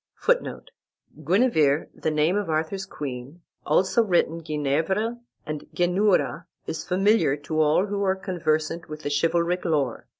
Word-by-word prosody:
[Footnote: - - -1 0.5
Guenever, 160 - +3
the - - -2
name 155 +4 +2
of 205 -4 -1
Arthur's 160 +5 -2
queen, 140 +1 -7 0.3
also 190 +5 +3
written 170 -5 +1
Genievre 160 +10 -1 0.3
and 150 -1 -6
Geneura, 180 -1 +1 0.2
is 160 - -4
familiar 190 -5 +2
to 155 +2 -1
all 155 +5 +3
who 205 0 -3
are 190 -1 +2
conversant 170 -3 -2
with 155 0 -8 0.2
chivalric 170 +2 +1
lore. 145 -7 -1
170 Hz, 130 wpm, -25 LUFS, 155-190 Hz, 0.5 s, Guenever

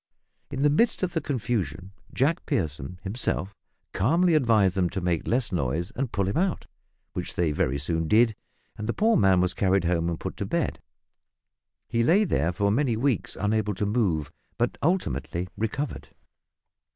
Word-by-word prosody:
In 135 0 -2
the 150 - +5
midst 220 +7 +2
of 180 - 0
the 165 - 0
confusion 105 - -2 0.2
Jack 155 +7 0
Pierson 80 - -2
himself 100 -2 -1 0.4
calmly 165 - +3
advised 115 - +4
them 90 -2 +1
to 95 - -3
make 85 -3 -1
less 120 -2 +1
noise 80 +2 -1
and 130 -1 -2
pull 100 -2 0
him 100 - -1
out, 185 0 0 0.5
which - - -4
they 85 -3 +1
very 70 -2 0
soon 80 +3 -1
did, 110 +3 +4 0.4
and 105 - -5
the 115 - 0
poor 225 +2 +3
man 95 -2 +4
was 90 0 +1
carried 95 -1 +2
home 85 -1 +1
and 85 - -3
put - - -5
to - - -3
bed. - - -1 1.1
He 115 - 0
lay 185 - +4
there 85 - +1
for 100 +3 +1
many 120 0 +1
weeks 125 -3 0
unable 105 0 0
to 105 - -1
move, 95 - 0 0.3
but 120 +1 0
ultimately 145 - -1
recovered. 115 +8 -3
105 Hz, 170 wpm, -26 LUFS, 90-135 Hz, 1.1 s, the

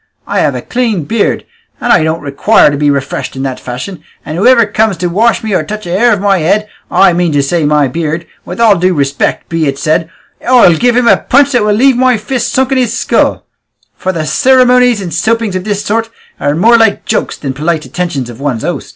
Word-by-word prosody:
I - - -2
have - - 0
a - - -5
clean 230 -9 -1
beard, 220 +7 -1 0.3
and 240 - +2
I 170 - +3
don't 160 +1 -2
require 145 +6 +3
to - - -2
be 145 +1 +1
refreshed 140 -1 -3
in 135 - -4
that 130 -2 -4
fashion, 130 +9 -7 0.2
and 155 - -5
whoever 230 +5 +4
comes 210 -1 0
to 180 - -4
wash 225 +7 +1
me 215 -2 -3
or 165 - +1
touch 215 +5 -7
a 170 - -6
hair 235 +7 +2
of 205 - +1
my 195 -1 +1
head, 205 +7 0 0.2
I 195 -2 +4
mean 175 -1 0
to 145 -1 +1
say 160 +2 -1
my 145 -1 +2
beard, 165 +4 -3 0.2
with 180 - -8
all 215 -5 +4
due 180 +1 +1
respect 140 -1 -1
be 165 -2 -1
it 135 0 -2
said, 160 +3 -1 0.3
I'll 245 -8 +5
give 245 +6 +1
him 250 -1 +2
a - - +5
punch 280 +2 +2
that 245 -4 +2
will 210 -1 +1
leave 260 +2 +3
my 255 -1 +2
fist 240 +2 -3
sunk 265 0 0
in 265 - +2
his 245 -1 -1
skull; - - 0 0.5
for 185 - -3
cirimonies 250 - +2
and 170 -3 -6
soapings 220 +2 -1
of 185 +1 -4
this 205 -1 -3
sort 225 +2 -1 0.3
are 145 +1 -1
more 230 +7 +4
like 225 -3 +1
jokes - - -2
than 140 - -4
the 130 - -14
polite 155 0 -1
attentions 170 -8 -4
of 120 0 -11
one's 135 -5 -3
host." - - -4
190 Hz, 230 wpm, -11 LUFS, 155-230 Hz, 0.5 s, I'll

